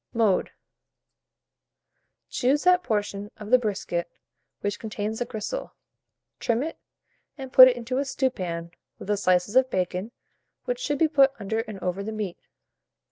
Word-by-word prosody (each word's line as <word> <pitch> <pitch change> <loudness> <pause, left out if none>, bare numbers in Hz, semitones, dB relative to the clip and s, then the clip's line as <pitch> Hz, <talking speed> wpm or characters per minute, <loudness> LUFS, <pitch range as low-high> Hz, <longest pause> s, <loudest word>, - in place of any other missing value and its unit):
Mode. 215 -5 +2 1.8
Choose 275 +4 +1
that 360 0 +5
portion 205 - -2
of 210 +1 -9
the 255 - +7
brisket 185 -6 -2 0.5
which 205 0 -2
contains 215 0 -4
the 245 - -1
gristle, 245 - -5 0.6
trim 235 +2 0
it, 325 - -6 0.6
and 265 -2 -8
put 255 -1 +11
it 245 -1 +2
into 250 +2 -2
a - - +1
stewpan 185 -12 -2 0.3
with - - -10
the 210 - +3
slices 185 +1 +1
of 260 0 +5
bacon, 185 +1 -2 0.6
which - - -2
should 290 -13 -1
be 320 - +4
put 275 -3 +4
under 220 +2 -2
and 215 -3 -5
over 180 +2 -2
the 215 +2 -4
meat. 210 -5 -4
220 Hz, 150 wpm, -26 LUFS, 200-260 Hz, 1.8 s, put